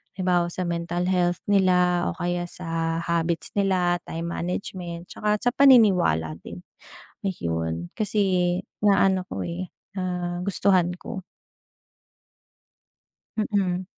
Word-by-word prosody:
halimbawa 180 Hz, -2 st, +1 dB
sa 185 Hz, -, -3 dB
mental 175 Hz, +1 st, -2 dB
health 175 Hz, -1 st, +1 dB
nila, 180 Hz, -2 st, +3 dB
o -, -, -8 dB
kaya 175 Hz, 0 st, -2 dB
sa 165 Hz, -2 st, -2 dB
habits 170 Hz, 0 st, -1 dB
nila, 185 Hz, -3 st, +2 dB
time 170 Hz, +1 st, -4 dB
management, 175 Hz, -1 st, -4 dB
'tsaka 210 Hz, 0 st, 0 dB
sa 245 Hz, -, +3 dB
paniniwala 185 Hz, -, +5 dB
din, 90 Hz, +1 st, -9 dB, 0.6 s
ayun. 85 Hz, -, -2 dB
Kasi 185 Hz, -4 st, +1 dB, 0.2 s
na-ano 190 Hz, -2 st, +4 dB
ko, -, -, -3 dB
eh, 175 Hz, +2 st, -4 dB, 0.3 s
nagustuhan 180 Hz, 0 st, +1 dB
ko. 190 Hz, -5 st, -6 dB, 2.1 s
Mm. 190 Hz, -4 st, 0 dB
180 Hz, 105 wpm, -25 LUFS, 170-190 Hz, 2.1 s, paniniwala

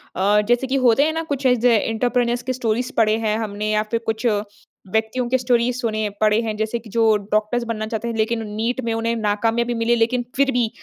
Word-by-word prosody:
अ, 205 Hz, +3 st, +3 dB
जैसे 245 Hz, +2 st, +2 dB
कि 265 Hz, -, -1 dB
होते 240 Hz, +4 st, +5 dB
हैं 315 Hz, +1 st, +1 dB
ना 325 Hz, -, -2 dB
कुछ 280 Hz, -3 st, -4 dB
ऐसे 245 Hz, -1 st, +4 dB
एंटरप्रेन्योर्स 240 Hz, +2 st, 0 dB
के 255 Hz, -, -2 dB
स्टोरीज़ 245 Hz, +1 st, -1 dB
पढ़े 220 Hz, -1 st, +3 dB
हैं 215 Hz, -1 st, 0 dB
हमने 210 Hz, -1 st, -3 dB
या 215 Hz, 0 st, +2 dB
फिर 230 Hz, -, +1 dB
कुछ 220 Hz, +2 st, -2 dB
व्यक्तियों 220 Hz, +2 st, -2 dB
के 260 Hz, -, +3 dB
स्टोरीज़ 245 Hz, -1 st, +1 dB
सुने 215 Hz, -2 st, -1 dB
पढ़े 215 Hz, 0 st, +4 dB
हैं 220 Hz, -2 st, -3 dB
जैसे 220 Hz, +2 st, -2 dB
कि 225 Hz, -, -14 dB
जो 225 Hz, 0 st, +3 dB, 0.2 s
डॉक्टर्स 215 Hz, +3 st, +1 dB
बनना 215 Hz, -2 st, -3 dB
चाहते 225 Hz, +1 st, -4 dB
हैं, 230 Hz, -, -3 dB
लेकिन 225 Hz, +1 st, 0 dB
नीट 225 Hz, +5 st, -2 dB
में 230 Hz, -, 0 dB
उन्हें 230 Hz, +1 st, -1 dB
नाकामयाबी 225 Hz, +2 st, 0 dB
मिले 230 Hz, +1 st, +1 dB
लेकिन 235 Hz, +2 st, +1 dB
फिर 275 Hz, 0 st, +2 dB
भी 240 Hz, -3 st, +1 dB
230 Hz, 215 wpm, -21 LUFS, 215-245 Hz, 0.2 s, होते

